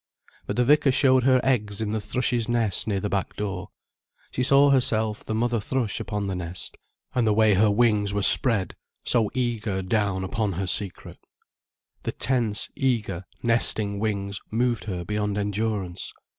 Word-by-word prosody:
But -, -, -2 dB
the 125 Hz, -, +2 dB
vicar 145 Hz, 0 st, +4 dB
showed 130 Hz, -1 st, +3 dB
her 130 Hz, -1 st, +5 dB
eggs 105 Hz, -6 st, 0 dB
in 110 Hz, -1 st, -2 dB
the 110 Hz, -1 st, -2 dB
thrush's 120 Hz, +2 st, -1 dB
nest 115 Hz, -5 st, 0 dB
near 100 Hz, -3 st, 0 dB
the 105 Hz, -, -2 dB
back 100 Hz, -2 st, -2 dB
door. 100 Hz, -1 st, -4 dB, 0.6 s
She -, -, -2 dB
saw 140 Hz, +2 st, +5 dB
herself 110 Hz, -5 st, +1 dB
the 110 Hz, -, -3 dB
mother 120 Hz, +1 st, 0 dB
thrush 120 Hz, -1 st, -2 dB
upon 105 Hz, -2 st, -3 dB
the 95 Hz, -, -2 dB
nest, 90 Hz, 0 st, -5 dB, 0.4 s
and 120 Hz, -3 st, +1 dB
the 105 Hz, -, +3 dB
way 110 Hz, -1 st, +4 dB
her 105 Hz, +3 st, +4 dB
wings 105 Hz, -2 st, +2 dB
were 100 Hz, -1 st, -1 dB
spread, 115 Hz, -7 st, +4 dB, 0.3 s
so 115 Hz, -4 st, +1 dB
eager 115 Hz, -6 st, -1 dB
down 100 Hz, -1 st, 0 dB
upon 100 Hz, +1 st, -1 dB
her 95 Hz, +3 st, -3 dB
secret. 95 Hz, 0 st, -2 dB, 0.8 s
The -, -, -4 dB
tense, 115 Hz, -3 st, 0 dB
eager, 105 Hz, -9 st, -1 dB, 0.2 s
nesting 110 Hz, -3 st, +1 dB
wings 100 Hz, -2 st, -2 dB
moved 120 Hz, 0 st, 0 dB
her 90 Hz, -4 st, -4 dB
beyond 105 Hz, +1 st, -2 dB
endurance. 100 Hz, -3 st, -2 dB
105 Hz, 165 wpm, -25 LUFS, 100-120 Hz, 0.8 s, her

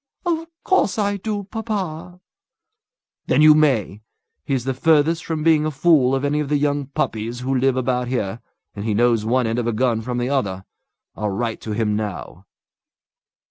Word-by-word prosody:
"Of 330 Hz, -1 st, -1 dB, 0.2 s
course 375 Hz, -, +2 dB
I 205 Hz, -1 st, 0 dB
do, 205 Hz, +1 st, -3 dB
papa." 185 Hz, -5 st, -5 dB, 1.1 s
"Then 150 Hz, -, +3 dB
you 155 Hz, 0 st, +9 dB
may. 130 Hz, -9 st, +1 dB, 0.4 s
He's 130 Hz, +2 st, -1 dB
the 135 Hz, +1 st, -1 dB
furthest 160 Hz, +4 st, +2 dB
from 160 Hz, -2 st, -3 dB
being 160 Hz, -2 st, +4 dB
a 155 Hz, -, 0 dB
fool 135 Hz, -3 st, +3 dB
of 135 Hz, +1 st, -1 dB
any 145 Hz, +1 st, 0 dB
of 150 Hz, -2 st, -2 dB
the 150 Hz, -, +2 dB
young 145 Hz, -1 st, 0 dB
puppies 115 Hz, -3 st, -3 dB
who 130 Hz, +2 st, -1 dB
live 130 Hz, 0 st, +2 dB
about 125 Hz, -1 st, 0 dB
here, 120 Hz, -3 st, -3 dB, 0.3 s
and 100 Hz, -, -5 dB
he 110 Hz, -1 st, -1 dB
knows 115 Hz, -1 st, +2 dB
one 125 Hz, +2 st, +1 dB
end 115 Hz, +2 st, -1 dB
of 120 Hz, -, -2 dB
a 120 Hz, -, 0 dB
gun 115 Hz, 0 st, +1 dB
from 125 Hz, +2 st, -4 dB
the 125 Hz, +1 st, -1 dB
other. 100 Hz, -9 st, -1 dB, 0.5 s
I'll 105 Hz, -1 st, -2 dB
write 115 Hz, +3 st, -3 dB
to 110 Hz, -, -4 dB
him 105 Hz, -1 st, 0 dB
now." 100 Hz, -3 st, -6 dB
130 Hz, 180 wpm, -21 LUFS, 115-155 Hz, 1.1 s, you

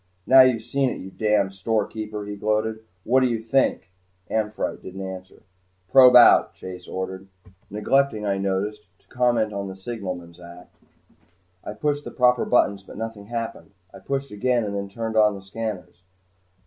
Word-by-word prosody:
"Now 130 Hz, 0 st, +8 dB
you've 125 Hz, -4 st, +3 dB
seen 135 Hz, +2 st, 0 dB
it, -, -, -5 dB
you 95 Hz, -, -9 dB
damned 105 Hz, -3 st, +1 dB
storekeeper," 105 Hz, +1 st, -3 dB
he 105 Hz, 0 st, -6 dB
gloated. 110 Hz, +1 st, -1 dB, 0.2 s
"What 130 Hz, +3 st, +3 dB
do 130 Hz, -, +3 dB
you 120 Hz, -2 st, -1 dB
think?" 110 Hz, -6 st, 0 dB, 0.4 s
"Amphitrite" 110 Hz, -1 st, -2 dB
didn't 95 Hz, +1 st, -7 dB
answer. 95 Hz, 0 st, -10 dB, 0.5 s
"Probe 125 Hz, 0 st, +8 dB
out," 120 Hz, -, +7 dB
Chase 90 Hz, -1 st, -9 dB
ordered, 95 Hz, +1 st, -5 dB, 0.4 s
neglecting, 110 Hz, +2 st, +1 dB
I 100 Hz, -1 st, 0 dB
noticed, 100 Hz, +2 st, -2 dB, 0.2 s
to -, -, -36 dB
comment 120 Hz, -4 st, +1 dB
on 100 Hz, -1 st, -4 dB
the 95 Hz, -, -7 dB
signalman's 90 Hz, -5 st, -7 dB
act. 85 Hz, 0 st, -14 dB, 0.9 s
I -, -, -6 dB
pushed 145 Hz, +5 st, -2 dB
the -, -, -7 dB
proper 125 Hz, -1 st, +2 dB
buttons 100 Hz, -5 st, +2 dB
but 95 Hz, -, -13 dB
nothing 110 Hz, -3 st, -6 dB
happened. 115 Hz, -3 st, -6 dB, 0.2 s
I -, -, -11 dB
pushed 135 Hz, +6 st, -4 dB
again 120 Hz, +3 st, 0 dB
and 100 Hz, -1 st, -4 dB
then 100 Hz, 0 st, -4 dB
turned 110 Hz, +2 st, -5 dB
on 105 Hz, -1 st, +4 dB
the 95 Hz, -, -10 dB
scanners. 95 Hz, -4 st, -6 dB
105 Hz, 165 wpm, -23 LUFS, 95-120 Hz, 0.9 s, Now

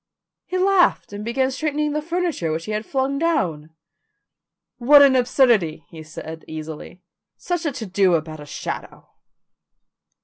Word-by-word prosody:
He 370 Hz, -, -2 dB
laughed 370 Hz, -, +2 dB
and 205 Hz, +1 st, -6 dB
began 260 Hz, +4 st, 0 dB
straightening 300 Hz, +2 st, -1 dB
the 300 Hz, +1 st, -1 dB
furniture 335 Hz, -, -2 dB
which 160 Hz, +1 st, -3 dB
he 215 Hz, -, -5 dB
had 215 Hz, +1 st, -3 dB
flung 275 Hz, +1 st, -1 dB
down. 180 Hz, -, -1 dB, 1.1 s
"What 285 Hz, +4 st, +7 dB
an 270 Hz, -2 st, +5 dB
absurdity," 235 Hz, -, +2 dB
he 160 Hz, -, -10 dB
said 160 Hz, +1 st, -9 dB
easily. 160 Hz, +3 st, -8 dB, 0.3 s
"Such 350 Hz, -2 st, -3 dB
a -, -, 0 dB
to 230 Hz, -, -6 dB
do 190 Hz, -2 st, +2 dB
about 155 Hz, -1 st, -4 dB
a 150 Hz, -, -10 dB
shadow." -, -, -7 dB
240 Hz, 145 wpm, -22 LUFS, -, 1.1 s, What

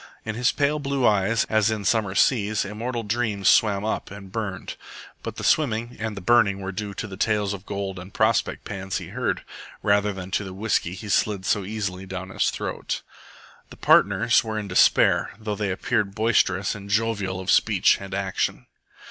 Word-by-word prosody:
In 110 Hz, -, -3 dB
his 125 Hz, +4 st, +2 dB
pale 150 Hz, +1 st, +1 dB
blue 140 Hz, -2 st, -1 dB
eyes, 105 Hz, +2 st, +3 dB
as 110 Hz, 0 st, +2 dB
in 110 Hz, -2 st, -2 dB
summer 100 Hz, -1 st, +1 dB
seas, 110 Hz, -4 st, +2 dB
immortal 115 Hz, +4 st, -4 dB
dreams 105 Hz, -3 st, -1 dB
swam 105 Hz, -2 st, +4 dB
up 110 Hz, -, -2 dB
and 100 Hz, -2 st, -10 dB
burned, 100 Hz, -4 st, -4 dB, 0.5 s
but -, -, -6 dB
the -, -, -7 dB
swimming 120 Hz, -5 st, +1 dB
and 110 Hz, -2 st, -4 dB
the -, -, -5 dB
burning 100 Hz, -1 st, +3 dB
were 95 Hz, 0 st, -4 dB
due 100 Hz, +1 st, -5 dB
to 110 Hz, -, -4 dB
the 95 Hz, -2 st, -9 dB
tales 105 Hz, -2 st, +1 dB
of 100 Hz, 0 st, -9 dB
gold 100 Hz, -2 st, -4 dB
and 95 Hz, +2 st, -10 dB
prospect 110 Hz, +1 st, +1 dB
pans 95 Hz, -1 st, -4 dB
he 90 Hz, -2 st, -7 dB
heard, 125 Hz, +5 st, -2 dB, 0.4 s
rather 105 Hz, 0 st, +3 dB
than 95 Hz, -1 st, -7 dB
to 105 Hz, -, 0 dB
the 95 Hz, -1 st, -8 dB
whisky 95 Hz, -3 st, -1 dB
he 105 Hz, -, -8 dB
slid 100 Hz, -1 st, +1 dB
so 105 Hz, -, +1 dB
easily 95 Hz, -2 st, -4 dB
down 95 Hz, 0 st, -6 dB
his -, -, +1 dB
throat. -, -, -4 dB, 0.7 s
The -, -, -13 dB
partners 105 Hz, +4 st, +4 dB
were 110 Hz, -1 st, -4 dB
in 105 Hz, -1 st, -4 dB
despair, 95 Hz, -, +4 dB
though 110 Hz, -1 st, -3 dB
they 105 Hz, -1 st, -2 dB
appeared 100 Hz, +1 st, -1 dB
boisterous 100 Hz, -4 st, +2 dB
and 100 Hz, -1 st, -9 dB
jovial 100 Hz, -3 st, 0 dB
of 95 Hz, -, -1 dB
speech -, -, +4 dB
and 95 Hz, -1 st, -6 dB
action. 95 Hz, -1 st, -2 dB
105 Hz, 190 wpm, -24 LUFS, 95-110 Hz, 0.7 s, swam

